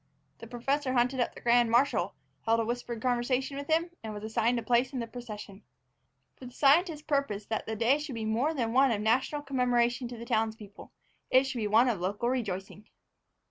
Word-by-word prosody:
The 230 - -10
professor 260 +3 -1
hunted 250 +1 +1
up 245 - 0
the - - -11
grand 240 0 +4
marshal, 245 +5 +2 0.3
held 225 +1 +3
a 225 - 0
whispered 240 -1 -4
conversation 255 +2 0
with 280 0 -6
him, 330 +2 +1
and 215 -1 -6
was 205 - -7
assigned 225 +2 +1
a 235 - -3
place 245 +4 +2
in - - -3
the 235 - -2
procession. 215 -4 -9 0.8
For 255 - -10
the 245 - -12
scientist 305 +3 +3
purposed 275 -9 -1
that 220 - -3
the 220 - -3
day 235 +6 +2
should 295 -4 -6
be 225 -1 -4
more 245 +9 0
than 230 -4 -1
one 270 +2 +5
of 225 -4 0
national 260 +7 +1
commemoration 245 -2 +1
to 240 0 -8
the 235 - -8
townspeople: 220 -3 -3 0.4
it 260 +1 +5
should 265 -2 -4
be 215 - -1
one 225 +5 +4
of 225 -7 0
local 205 +6 -1
rejoicing. 210 -4 -4
240 Hz, 205 wpm, -29 LUFS, 220-265 Hz, 0.8 s, one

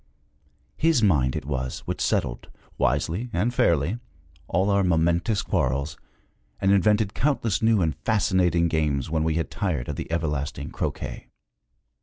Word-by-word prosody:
His 160 -7 +3
mind 70 -10 +3
it - - -4
was 65 -3 -3
which - - -5
settled, - - -1 0.3
wisely 80 - 0
and 105 +8 0
fairly, 85 - +2 0.5
all 95 +4 +1
our 100 0 +3
momentous 85 +3 +1
quarrels, 70 +4 -1 0.6
and 95 - +2
invented 105 +1 +3
countless 125 -7 0
new 110 -4 +3
and 80 -3 0
fascinating 90 -4 +2
games 75 -3 0
when 80 -1 +1
we 80 -1 0
had 80 - -2
tired 80 -11 -2
of - - -4
the - - -6
everlasting 75 -3 -2
croquet. - - -4
85 Hz, 140 wpm, -25 LUFS, 75-100 Hz, 0.6 s, His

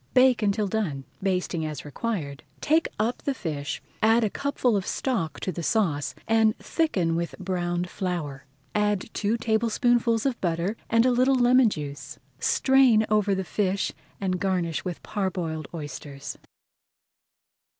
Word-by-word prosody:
Bake 255 -1 +5
until 210 0 +1
done, 180 -10 -2 0.2
basting 185 -3 0
as 150 -4 -5
required. 150 -4 -3 0.2
Take 320 +2 +2
up 225 +4 -1
the 280 - -1
fish, 150 - -4 0.2
add 225 +2 +5
a 210 - +1
cupful 270 -5 0
of 195 - 0
stock 225 - -1
to 185 - -1
the 170 - -5
sauce, 165 -6 0
and 220 -1 +3
thicken 185 - 0
with 170 0 -2
browned 175 -2 -2
flour. 160 -8 -4 0.3
Add 210 0 0
two 215 +2 0
tablespoonfuls 230 +1 +2
of 265 -3 -1
butter 175 +4 0
and 230 +1 +4
a 255 - +4
little 255 +2 +4
lemon 250 -1 +5
juice. 145 -5 -6 0.2
Strain 260 -5 +4
over 210 -2 +3
the 190 - -2
fish 195 +2 0 0.3
and 185 -2 -1
garnish 180 -5 0
with 180 -3 -5
parboiled 175 -7 -2
oysters. 145 -3 -7
200 Hz, 140 wpm, -26 LUFS, 170-230 Hz, 0.3 s, Bake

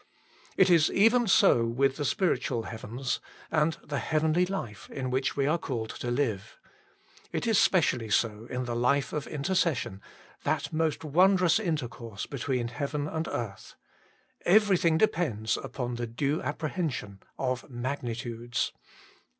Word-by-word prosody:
It - - +5
is 165 -3 +5
even 225 +3 +4
so 120 -9 +5
with 135 +3 +1
the 145 - -2
spiritual 135 - 0
heavens, 120 +3 -4 0.3
and 155 0 +2
the 140 -1 -3
heavenly 160 +3 +1
life 120 - -5
in 130 -2 -4
which 130 +2 0
we 140 - +2
are 155 +4 +2
called 115 -7 -3
to 120 - -5
live. 120 -6 -1 0.7
It - - -2
is 225 -3 +4
specially 130 - +2
so 110 +2 0
in 125 0 -3
the 120 -1 -3
life 125 +2 +1
of 150 -2 -3
intercession, 145 - -1 0.4
that - - -1
most 160 0 0
wondrous 180 +4 +4
intercourse 120 - -3
be 140 - -7
tween 125 -2 -1
heaven 145 +4 -3
and 160 0 -3
earth. 105 -5 -5 0.7
Everything 185 -4 +4
depends 145 - +1
upon 125 -2 -4
the 120 0 -3
due 140 +6 -1
apprehension 145 - -3 0.2
of 130 -2 -2
magnitudes. 120 -2 -3
140 Hz, 140 wpm, -28 LUFS, 120-160 Hz, 0.7 s, It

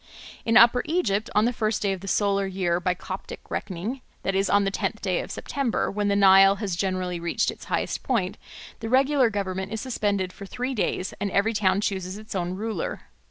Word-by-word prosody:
In 230 0 +4
Upper 240 +1 +7
Egypt 220 - 0
on 210 +1 +4
the 245 - +1
first 215 -2 -1
day 200 -1 +1
of 190 - -7
the 195 - -8
solar 200 0 +1
year 180 -2 0
by 180 0 0
Coptic 190 +1 -7
reckoning, 210 +7 -4 0.2
that 195 - 0
is, 195 +1 +1
on 205 0 +4
the 195 - 0
tenth - - -3
of - - -1
September, 275 -5 -2
when 205 0 -1
the 200 - +2
Nile 195 0 +7
has 200 -3 -3
generally 185 -1 -2
reached 170 0 0
its - - -12
highest - - -2
point, 200 -8 -1 0.4
the 225 - -5
regular 265 0 +4
government 190 -2 -3
is 220 - -3
suspended 205 -7 -1
for 200 - -10
three 250 +5 -3
days 195 -4 -1
and 205 - 0
every 200 +4 +1
town 200 -2 +2
chooses 190 -2 -2
its 215 0 -9
own 180 -1 -2
ruler. 210 -3 -3
200 Hz, 205 wpm, -25 LUFS, 190-225 Hz, 0.4 s, Upper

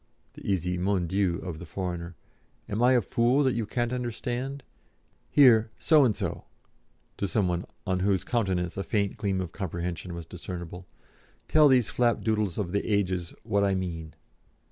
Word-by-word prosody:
(the - - -12
easy 90 -2 -1
"Mon 95 -1 +1
Dieu" 95 0 +1
of 85 -3 -5
the 90 - -8
foreigner) 90 -1 -4 0.5
"am 105 +3 -2
I 125 +1 +5
a 125 - +4
fool 120 +8 +2
that 130 -2 +2
you 115 -3 -2
can't 120 +2 -1
understand? 125 +2 -3 0.7
Here, 115 -6 +6
So 155 -3 +5
and 110 -5 +2
so" - - -4 0.7
to 100 - -1
some 95 +2 +1
one 90 0 -1 0.2
on 95 -2 0
whose 95 0 +1
countenance 95 -7 -1
a 100 - -1
faint 100 -2 0
gleam 100 -3 -1
of 90 -3 -4
comprehension 90 -1 -4
was 85 -1 -7
discernible 90 +1 -7 0.6
"tell 155 -1 +6
these 125 -5 +4
flapdoodles 110 -5 +1
of 95 -5 -2
the 100 - 0
ages 90 -4 0
what 100 -2 +1
I 100 -1 +2
mean." 85 -4 -4
100 Hz, 165 wpm, -28 LUFS, 90-115 Hz, 0.7 s, Here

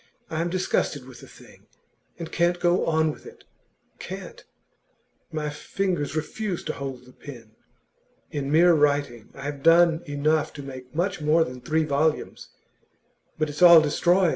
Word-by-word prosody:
I 160 0 -1
am 170 - -1
disgusted 170 -6 -1
with 130 -2 -13
the - - -13
thing, - - -18 0.5
and 165 -2 -7
can't 175 +1 +1
go 175 +1 +1
on 160 -1 +2
with - - -13
it - - -14 0.6
can't! - - -8 0.9
My 150 -1 -3
fingers 160 0 -3
refuse 175 +4 -3
to - - -3
hold 135 -2 -7
the 125 - -16
pen. 120 -6 -12 0.8
In 140 -1 -3
mere 170 +3 +5
writing, 145 -6 0
I 135 - -9
have 145 -1 -5
done 165 +1 +5
enough 145 +2 0
to 145 - -9
make 130 0 -10
much 180 +1 -1
more 155 +2 +3
than 125 -3 -8
three 160 +4 0
volumes; 155 +1 -1 0.9
but 155 -1 0
it's 150 +3 -8
all 170 -2 +10
destroyed. 175 +4 +2
155 Hz, 160 wpm, -25 LUFS, 140-170 Hz, 0.9 s, all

